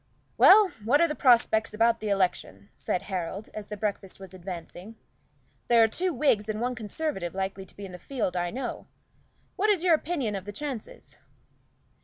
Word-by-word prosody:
"Well, 410 0 +7
what 260 +7 +3
are 335 - +4
the 300 - -3
prospects 230 -5 +3
about 230 +1 +2
election?" 185 - -1
said 180 - -2
Harold, 190 +1 -5
as 210 -1 -7
the 210 - -6
breakfast 200 -2 -4
was 190 -1 -11
advancing. 185 +3 -8 0.7
"There 235 -1 +6
are - - +5
two 360 +11 -1
Whigs 240 -7 +1
and 215 0 -2
one 250 +2 -1
Conservative 220 - -4
likely 190 0 -4
to - - -19
be 200 - -7
in 190 - -9
the 180 - -9
field, 230 -8 -3
I 175 0 -1
know. 250 +4 -5 0.7
What 425 +3 +2
is 385 -5 +2
your 355 -2 +5
opinion 300 -8 -1
of 190 -1 -6
the 205 - -6
chances?" 260 0 -7
215 Hz, 180 wpm, -27 LUFS, 190-270 Hz, 0.7 s, Well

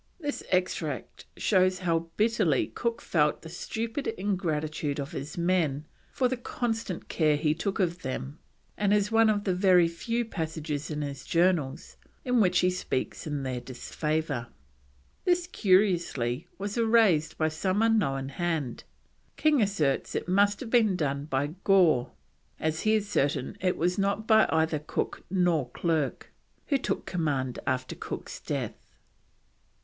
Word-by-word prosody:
This 290 -3 -3
extract 175 -6 -2
shows 185 -2 +3
how 165 -2 -1
bitterly 210 - +2
Cook 235 -1 -2
felt 150 -3 +1
the 160 - -8
stupid 225 - -4
ingratitude 155 -6 -1
of 140 +2 -4
his 150 -1 -6
men 170 -5 +1 0.3
for 255 - +1
the 255 0 -2
constant 225 -6 -3
care 155 -3 +2
he 150 +1 +1
took 195 +6 -3
of 180 -1 0
them, 135 +3 -5 0.4
and 205 0 +2
is 205 +1 +1
one 225 0 +5
of 205 -1 +1
the 190 - +1
very 180 -2 +5
few 230 +8 -2
passages 160 -6 -4
in 150 -1 -3
his 140 -1 -6
Journals 170 -6 0 0.3
in 250 -2 +3
which 180 -3 +3
he 180 - +3
speaks 160 -5 -3
in 145 -2 -2
their 130 -2 -3
disfavour. 145 +1 -3 0.8
This, 355 -1 +2
curiously, 175 - +1
was 200 +3 -4
erased 220 -9 +3
by 155 0 +2
some 185 +7 0
unknown 135 -13 +1
hand; 155 -4 -2 0.5
King 305 -4 +3
asserts 165 -10 0
it - - -2
must 200 +4 +3
have 235 -4 -6
been 220 -6 +4
done 140 -4 -1
by 145 +1 -1
Gore, 170 -11 +4 0.5
as 160 0 -1
he 215 0 +3
is 210 -1 0
certain 140 -8 0
it 185 -1 +1
was 180 +3 0
not 200 +2 0
by 220 -1 +5
either 160 -1 +2
Cook 150 - -3 0.2
or 155 -8 +1
Clerke, 160 +1 -1 0.3
who 280 -2 +1
took - - -2
command 140 -7 -1
after 130 0 -1
Cook's - - -6
death. - - -4
175 Hz, 150 wpm, -28 LUFS, 150-205 Hz, 0.8 s, one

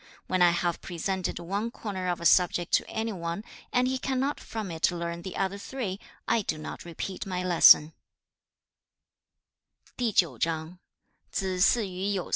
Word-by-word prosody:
When 185 -1 0
I 175 - +7
have 170 0 -1
presented 185 +1 -3
one 200 +6 -2
corner 195 -6 -5
of 175 -1 -1
a 170 - -7
subject 175 0 +3
to - - +2
any 225 0 -2
one, 170 +2 -4 0.3
and 250 0 +2
he 260 0 -1
cannot 270 +2 -1
from 215 -5 -5
it 160 0 +2
learn 170 -1 -4
the 185 +1 -7
other 195 +1 -1
three, 200 -5 -4 0.3
I 230 -1 +3
do 180 - -2
not 155 - -7
repeat 180 +3 -5
my 180 -1 -2
lesson.' 165 -3 +7
185 Hz, 130 wpm, -28 LUFS, 170-210 Hz, 0.3 s, I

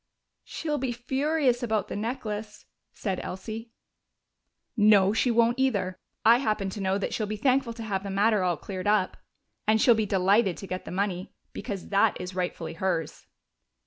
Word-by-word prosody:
"She'll 300 -2 -3
be 260 -1 -1
furious 265 +1 0
about 220 -4 0
the - - -5
necklace," 215 -1 -4 0.3
said 190 -3 -3
Elsie. 220 +5 -6 1.1
"No, 205 -3 +5
she 235 +3 +2
won't 235 +2 +3
either. 200 -9 0 0.3
I 230 +2 +7
happen 215 -6 -1
to 205 - -6
know 190 0 +1
that 200 - -3
she'll 215 - -1
be 215 +1 -3
thankful 255 0 +2
to 230 0 -7
have 200 -3 -2
the 200 - -6
matter 205 +2 +2
all 180 -3 +1
cleared 185 +3 -5
up. 205 -3 +2 0.5
And 220 +1 +4
she'll 240 - +6
be 220 -2 0
delighted 195 0 +3
to - - -7
get 185 -1 -5
the - - -7
money, 190 0 -2 0.2
because 200 -6 -6
that 200 0 +3
is 180 +1 -6
rightfully 180 -3 -3
hers." 165 -2 -2
210 Hz, 175 wpm, -27 LUFS, 190-235 Hz, 1.1 s, I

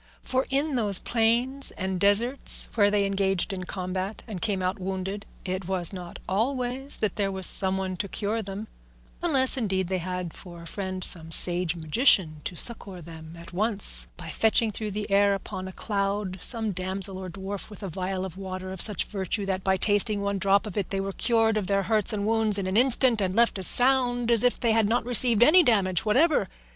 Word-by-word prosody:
For 260 +1 -2
in 280 +3 -1
those 205 -5 +2
plains 240 +6 +1
and 190 -1 -3
deserts 220 +8 +3
where 205 -3 +3
they 205 -1 +1
engaged 195 0 -1
in 185 -1 -6
combat 185 +2 -5
and 200 -6 -7
came 195 -3 -1
out 185 +3 -2
wounded, 190 +2 -5 0.2
it 185 -1 -4
was 185 -1 0
not 180 -2 -8
always 250 +6 -2
that 210 -4 -3
there 200 -2 -1
was 190 -1 0
some 190 -1 +5
one 190 -1 -4
to 200 - -3
cure 215 +3 -3
them, 200 +1 -7 0.5
unless 275 -6 +4
indeed 190 -6 -2
they 190 -1 -1
had 180 -1 -5
for 175 -2 -12
a - - -12
friend 185 +1 -5
some 165 -2 0
sage 175 0 +5
magician 160 - +2
to 180 - -5
succour 195 -2 -2
them 160 -1 -12
at 170 +1 -12
once 210 +2 +3
by 175 -2 -9
fetching 220 +4 +2
through 215 +1 -4
the 210 +1 -5
air 200 0 +3
upon 185 -1 -7
a - - -8
cloud 200 -1 -3
some 225 -3 +3
damsel 190 +1 -2
or 185 -1 -7
dwarf 195 +3 -7
with 210 0 -12
a - - -4
vial 185 +2 -4
of 185 -1 -9
water 185 -1 -7
of 190 - -6
such 210 -4 0
virtue 195 0 -3
that 190 -1 -3
by 190 0 +1
tasting 205 +1 +2
one 200 0 -2
drop 200 +2 +2
of 210 - -8
it 200 - -2
they 195 - -3
were 195 0 -4
cured 225 -1 +1
of 200 -3 -3
their 195 -1 0
hurts 215 +2 0
and 205 -2 -3
wounds 220 -2 +1
in 195 - -3
an 190 +1 -3
instant 245 -1 +2
and 185 -1 -2
left 230 -3 +2
as 185 - 0
sound 245 -2 +1
as 230 -1 +4
if 245 - +1
they 235 -2 +1
had 220 -2 +2
not 235 0 0
received 240 -2 +3
any 325 +8 +6
damage 200 - +1
whatever. 260 - +2
200 Hz, 210 wpm, -25 LUFS, 185-225 Hz, 0.5 s, any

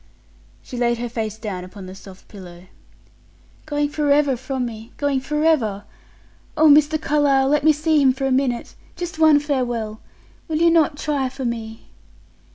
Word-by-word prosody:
She 250 - -8
laid 240 -1 +1
her 240 +1 -4
face 220 -2 -4
down 200 -5 -5
upon 185 +1 -11
the 185 - -9
soft 190 -1 -14
pillow. 180 -3 -12 1.0
"Going 290 -1 0
forever 290 -2 +2
from 255 +1 -4
me 225 -1 -9
going 285 -2 0
forever? 275 -8 0 0.7
Oh, 315 +1 +5
Mr. 300 +1 +5
Carlyle, 285 -3 +2
let 295 0 +2
me 315 - +6
see 305 0 +1
him 265 -2 +5
for 270 +1 -3
a 270 - 0
minute 255 -2 -1 0.2
just 350 -2 -6
one 310 -2 +6
farewell! 240 -7 -3 0.5
Will 315 -2 -1
you 335 +1 +4
not 315 -3 +2
try 285 -4 -1
for 265 0 -6
me!" 225 -2 -5
270 Hz, 165 wpm, -21 LUFS, 225-300 Hz, 1.0 s, me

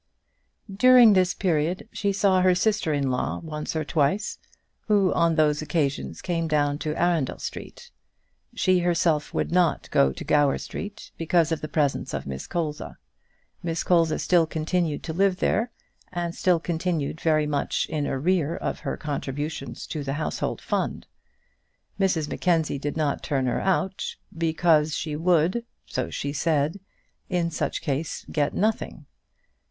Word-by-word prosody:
During 245 0 +7
this 185 -1 +3
period 170 0 0
she 200 -1 -1
saw 195 -1 +3
her 185 0 +4
sister 210 -3 +1
in 140 -3 0
law 125 - -1
once 155 -1 -5
or 155 -1 -1
twice, 155 +8 0 0.5
who 200 -3 +3
on 170 -1 +2
those 150 -1 +2
occasions 150 -3 -2
came 165 -2 -1
down 145 -2 +1
to 155 0 -3
Arundel 170 -6 +1
Street. - - -8 0.6
She 185 -1 +3
herself 170 -3 +1
would - - -1
not 175 -4 +1
go 65 -1 +4
to - - -7
Gower 145 -2 +3
Street, 205 +1 -7
because 165 0 +2
of 160 - -1
the 155 - -4
presence 150 -2 0
of - - -4
Miss 65 -1 -6
Colza. 155 -4 -3 0.6
Miss 165 -2 -2
Colza 165 -3 +3
still 170 -3 +3
continued 160 0 -1
to 160 - -4
live 190 +1 +2
there, 225 +5 0 0.4
and 175 -1 -3
still 180 -2 +2
continued 165 -3 -2
very 155 -2 +2
much 145 -1 -1
in 150 -2 -2
arrear 165 +3 0
in - - -2
her - - -4
contributions 145 -2 -4
to 150 -3 -4
the 135 0 -2
household 155 +2 -3
fund. - - -2 0.9
Mrs 180 -6 +1
Mackenzie 160 -4 0
did 145 +2 -3
not 150 -3 0
turn 135 -4 -1
her 125 - 0
out, 190 0 -1 0.2
because 160 -2 +2
she 150 -2 -3
would, 175 +6 +2 0.2
so - - -3
she 140 0 -3
said, 155 +4 0 0.5
in 175 -2 0
such - - -2
case 145 +2 -3
get 145 -2 0
nothing. 215 +3 -1
160 Hz, 150 wpm, -25 LUFS, 150-180 Hz, 0.9 s, During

